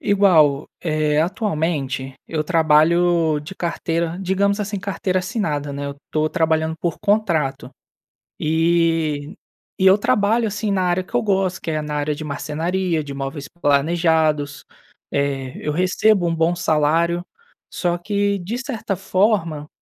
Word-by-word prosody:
igual 165 -9 +3
eh, 155 -2 0
atualmente, 155 - -2
eu 155 -2 -2
trabalho 165 0 +3
de 150 - -9
carteira 170 -1 -2
digamos 200 +2 +1
assim, 205 -1 -3
carteira 190 -1 -1
assinada, 155 -7 -2
né. 140 0 -4
Eu 140 - -4
estou 155 0 0
trabalhando 160 -1 0
por 170 -3 -2
contrato. 170 -12 0 0.7
Eh, 160 -2 +1 0.5
e 190 - +1
eu 190 +1 +7
trabalho 215 +3 +2
assim 210 +1 -2
na 190 -1 +1
área 180 0 +1
que 190 - -21
eu 240 - +2
gosto, 195 -3 0
que 165 - -4
é 155 - -1
na 150 0 -4
área 150 0 -1
de 155 +2 -7
marcenaria 160 +4 -2
de 140 -1 -7
móveis 140 +1 -5 0.2
planejados, 150 -1 +1 0.5
eh, 135 -2 -1
eu 150 - -1
recebo 185 +3 +2
um 165 - 0
bom 165 +2 +1
salário, 165 +2 +1 0.5
só 175 -1 0
que, 200 +2 0
de 215 +8 -4
certa 245 -7 -3
forma, 185 -5 0
165 Hz, 140 wpm, -21 LUFS, 150-190 Hz, 0.7 s, eu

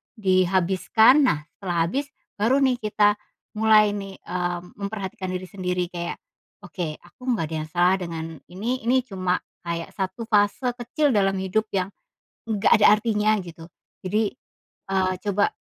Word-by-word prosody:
dihabiskan 190 - +4
nah 150 -1 0 0.2
setelah 175 -4 0
habis 275 +9 -2 0.3
baru 260 +6 +3
nih 255 -2 +2
kita 210 -1 +2 0.4
mulai 215 -1 +5
nih, 195 -1 -6
eee, 175 0 -3 0.2
memperhatikan 200 -2 -4
diri 185 0 -3
sendiri 180 -2 -2
kayak, 170 -1 -4 0.5
oke 175 -6 -4
aku 175 +7 -22
nggak 185 -9 -1
ada 160 - -4
yang - - -16
salah 180 +2 +4
dengan 170 -3 -5 0.3
ini 230 +5 -3
ini 255 +2 +3
cuma 185 -6 -2 0.3
kayak 170 0 -3
1 195 +4 -4
fase 210 +4 +2
kecil 280 +5 0
dalam 195 -2 +3
hidup 200 +4 0
yang, 185 -1 0 0.6
nggak 215 -3 +1
ada 210 - +6
artinya 215 -1 +1
gitu, 165 -2 -11 0.4
jadi, 210 +2 +1 0.6
eee, 190 -1 +1
coba, 205 -1 +1
195 Hz, 145 wpm, -24 LUFS, 180-220 Hz, 0.6 s, ada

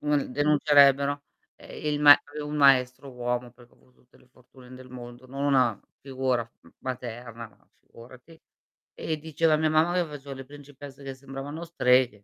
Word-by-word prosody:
un 150 -3 -1
denuncerebbero, 145 -1 +3 0.3
ehm, - - -12
il 145 - -3
ma 145 -1 +10 0.3
un 150 +1 -5
maestro 135 -1 +3
uomo, 125 0 -3
perché 120 -1 -20
ho - - -26
avu 125 - -28
tutte 125 - -27
le - - -24
fortune 125 0 -17
del 130 0 -13
mondo, 120 0 -11
non 135 +2 -5
una 130 -7 +2 0.2
figura 130 -2 -1 0.2
m - - -19
materna, 120 -2 -7 0.3
figurati, 130 +7 -16 0.6
e 160 - -4
diceva 160 +1 0
a - - +3
mia 155 0 +1
mamma 155 +3 +2
che 180 -1 +1
facevo 145 -3 -9
le 135 0 -9
principesse 140 0 -13
che 135 -1 -6
sembravano 135 +4 -8
streghe. 125 -9 +2
135 Hz, 165 wpm, -26 LUFS, 125-145 Hz, 0.6 s, ma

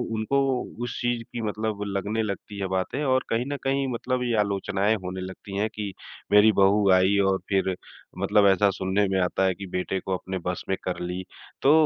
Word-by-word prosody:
उनको 110 +6 +1 0.4
उस 120 - -4
चीज़ 120 -1 0
की 120 - -4
मतलब 105 -1 -2
लगने 100 +3 -1
लगती 100 0 -5
है 95 - -1
बातें, 95 +10 -1
और 130 -1 +2
कहीं 115 +2 0
न - - -3
कहीं 135 0 +1
मतलब 125 +1 -1
ये 120 -2 0
आलोचनाएँ 100 +1 +1
होने 90 +1 -4
लगती 95 +1 -7
हैं 105 +2 +1
कि 105 -2 -4 0.4
मेरी 105 +1 +7
बहू 100 +1 +4
आई 95 +2 +4
और 95 - +2
फिर 95 -1 +1 0.4
मतलब 100 +1 +4
ऐसा 100 +1 +4
सुनने 95 +2 +1
में 95 - +1
आता 90 +2 +1
है 95 - +2
कि 100 - -7
बेटे 90 +1 -1
को 95 - -3
अपने 95 +1 -3
बस 90 0 -2
में 95 - +2
कर 90 - -3
ली। 90 +1 -3 0.4
तो 140 - +5
100 Hz, 200 wpm, -26 LUFS, 95-110 Hz, 0.4 s, मेरी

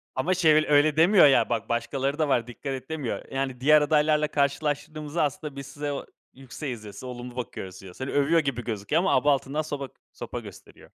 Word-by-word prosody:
Ama 165 +8 +1
şey, 165 -4 +4
böyle, 155 0 +3
öyle 150 +1 +4
demiyor, 175 -1 +7
ya 135 - +4
bak 115 -1 -2
başkaları 135 +5 -1
da 155 - +2
var, 120 -3 +1
dikkat 135 +3 -6
et 130 +2 -7
demiyor. 150 -6 -3
Yani, 135 -2 -3
diğer 150 +2 +6
adaylarla 150 0 +3
karşılaştırdığımızda, 150 +2 -1
aslında 145 0 -3
biz 140 -1 -7
size 145 0 -4
o, - - -5 0.3
yükseğiz 130 -3 -7
diyor, 105 -1 -10
olumlu 125 -1 -7
bakıyoruz 95 -6 -6
diyor. 95 -2 -11
Seni 130 +6 -5
övüyor 145 +4 +3
gibi 135 -5 -2
gözüküyor 115 +8 -1
ama, 190 - +2
aba 145 - +4
altından 140 +3 -2
soba 145 -3 -5 0.2
sopa - - -6
gösteriyor. - - -14
140 Hz, 195 wpm, -26 LUFS, 125-150 Hz, 0.3 s, demiyor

